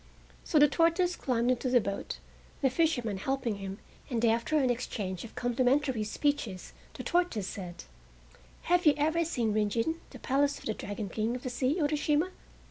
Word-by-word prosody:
So 315 - +1
the 295 0 +8
tortoise 335 +4 +2
climbed 245 -1 +1
into 255 +1 0
the 245 0 +5
boat, 200 -2 -4 0.5
the 265 - +4
fisherman 250 - +1
helping 240 0 -1
him, 195 0 -6 0.3
and 235 -3 +1
after 235 +7 +2
an 260 -4 +3
exchange 200 -7 -3
of 230 - -11
complimentary 250 0 +1
speeches 215 -4 -2 0.2
the - - -6
tortoise 345 - +1
said: 180 -3 -6 0.8
"Have 355 -1 +3
you 295 - +7
ever 315 +3 +2
seen 240 -9 0
Rin 210 -1 +2
Gin, 280 +11 -1
the 255 - -10
Palace 280 +3 +1
of - - -13
the 220 - 0
Dragon 205 0 -5
King 220 +5 -1
of 250 - -6
the 255 - -3
Sea, 255 +4 +1
Urashima?" 300 +3 +1
250 Hz, 175 wpm, -30 LUFS, 220-295 Hz, 0.8 s, the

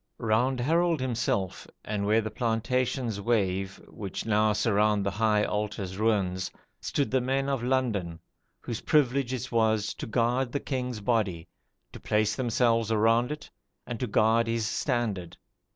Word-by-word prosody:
Round 125 +3 +1
Harold 165 +5 +2
himself, 115 -7 -1 0.2
and 100 -1 -2
where 110 +2 +4
the 110 0 -5
plantations 120 0 -1
wave 95 -3 0
which 100 -3 -6
now 110 -1 +3
surround 105 -1 +2
the 100 - 0
high 105 +1 +2
altar's 105 -3 -3
ruins, 95 -5 +1 0.3
stood 140 - -1
the 130 0 +2
men 135 +2 0
of 135 -3 -1
London, 115 -10 -1 0.4
"whose 115 - -5
privilege 135 -3 +2
it 130 -1 -4
was 110 -2 +2
to - - -7
guard 120 +2 +1
the 140 - 0
king's 125 -6 -3
body, 100 -7 0 0.5
to - - -9
place 110 0 +1
themselves 115 -2 +1
around 115 +4 +3
it, 150 +1 -7 0.3
and 120 -2 -5
to 125 - -1
guard 115 +2 +3
his 115 -1 0
standard." 110 - -2
115 Hz, 150 wpm, -28 LUFS, 105-125 Hz, 0.5 s, where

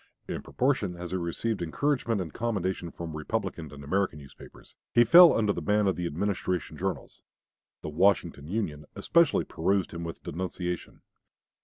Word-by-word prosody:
In - - -4
proportion 125 -9 0
as 90 0 -7
he 95 - 0
received 90 +4 -2
encouragement 115 - 0
and 80 -4 -6
commendation 95 -6 -2
from 85 -2 -7
Republican 80 0 -3
and 70 -1 -10
American 95 +2 0
newspapers, 70 -2 -14 0.2
he 120 - +6
fell 170 +8 +9
under 105 -2 +2
the 85 - -4
ban 105 +6 +2
of 95 - +2
the 90 -1 -2
Administration 90 0 -2
journals. - - -4 0.6
The - - -4
"Washington 80 -3 +1
Union" 80 -7 -3
especially 170 -3 +3
pursued 95 +3 0
him 85 0 -6
with 85 0 -7
denunciation. 90 +1 -4
90 Hz, 155 wpm, -28 LUFS, 80-105 Hz, 0.6 s, fell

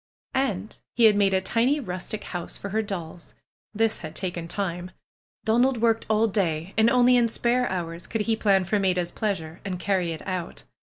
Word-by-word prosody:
And 215 -7 -1 0.2
he 240 - +2
had 215 -2 +7
made 200 -2 +3
a 190 - +2
tiny 245 +9 +2
rustic 195 -2 -4
house 175 -2 -5
for 200 - -6
her 220 +3 0
dolls. 175 -5 -7 0.4
This 225 0 +1
had 155 -1 -8
taken 175 -3 -3
time. 180 -1 -3 0.6
Donald 245 +3 +3
worked 225 -1 +2
all 215 +1 +3
day 185 -4 -1
and 220 +1 +5
only 250 0 +5
in 235 -1 +4
spare 240 +2 +1
hours 170 -2 -4
could 225 - -2
he 225 +1 +1
plan 200 -3 +3
for 205 +3 0
Maida's 180 -3 0
pleasure 180 -6 -3
and 185 -3 -4
carry 185 -3 0
it 160 - -7
out. 185 -3 -4
200 Hz, 185 wpm, -25 LUFS, 180-225 Hz, 0.6 s, had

